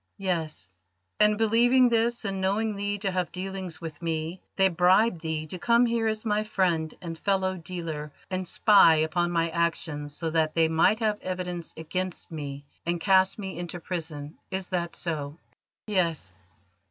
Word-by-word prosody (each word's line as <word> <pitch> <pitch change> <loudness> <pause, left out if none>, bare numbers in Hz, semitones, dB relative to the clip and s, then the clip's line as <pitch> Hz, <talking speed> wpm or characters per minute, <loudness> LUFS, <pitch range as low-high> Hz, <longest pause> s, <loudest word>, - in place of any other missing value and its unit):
"Yes." 170 - -3 0.5
"And, 210 0 +5
believing 240 +4 +5
this, 235 0 +1
and 195 -2 -2
knowing 210 +3 0
thee 205 +1 -2
to 195 -1 -1
have 180 -1 -1
dealings 185 -3 -5
with 165 -1 -8
me, 165 +1 -3
they 195 0 +5
bribed 180 +2 +3
thee 160 -1 -3
to 180 +4 -5
come 235 +4 +4
here 230 -1 +1
as 215 +1 -2
my 210 -1 +1
friend 175 -7 0
and 165 -1 -5
fellow 190 -2 +1
dealer 160 -4 -5 0.2
and 185 -1 -2
spy 200 -4 +6
upon 160 +3 +1
my 165 -1 0
actions, 160 -3 -2
so 165 -2 -2
that 160 -1 +1
they 165 -1 +4
might 165 +6 +3
have 210 -1 0
evidence 180 -2 -4
against 180 +3 -4
me 145 -3 -6 0.2
and 170 0 -1
cast 190 +1 +3
me 190 -4 -6
into 175 0 -5
prison. 160 -4 -6
Is 190 -1 -4
that 175 -2 -2
so?" 150 -3 -3 0.5
"Yes." 170 - -1
180 Hz, 165 wpm, -27 LUFS, 160-200 Hz, 0.5 s, spy